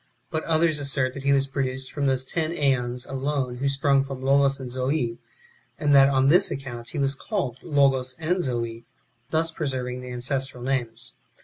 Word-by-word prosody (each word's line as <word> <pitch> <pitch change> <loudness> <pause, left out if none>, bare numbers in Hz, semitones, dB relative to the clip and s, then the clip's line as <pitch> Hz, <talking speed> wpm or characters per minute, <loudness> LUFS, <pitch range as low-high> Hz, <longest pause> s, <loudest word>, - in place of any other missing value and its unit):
But 160 -1 -2
others 160 -1 +2
assert 135 -2 +2
that 135 - -7
he 140 +1 +2
was 135 -1 +3
produced 135 -1 -3
from 145 -2 -1
those 130 -1 +1
ten 160 +2 -2
JEons 130 -6 0
alone 135 -2 -2
who 140 +2 0
sprung 135 0 +2
from 135 -1 -7
Logos 135 0 +3
and 130 -2 -6
Zoe, 130 -2 -1 0.6
and 145 -1 +2
that 135 0 +7
on 135 -1 +3
this 180 +7 +5
account 120 -3 -6
he - - -6
was 140 -1 +1
called 130 -2 -3
Logos 135 -5 +2
and 175 +3 0
Zoe, 115 -2 -3 0.4
thus 160 +1 +1
preserving 130 -5 -3
the 125 - -8
ancestral 130 0 -3
names. 125 -4 -3
135 Hz, 180 wpm, -25 LUFS, 125-140 Hz, 0.6 s, that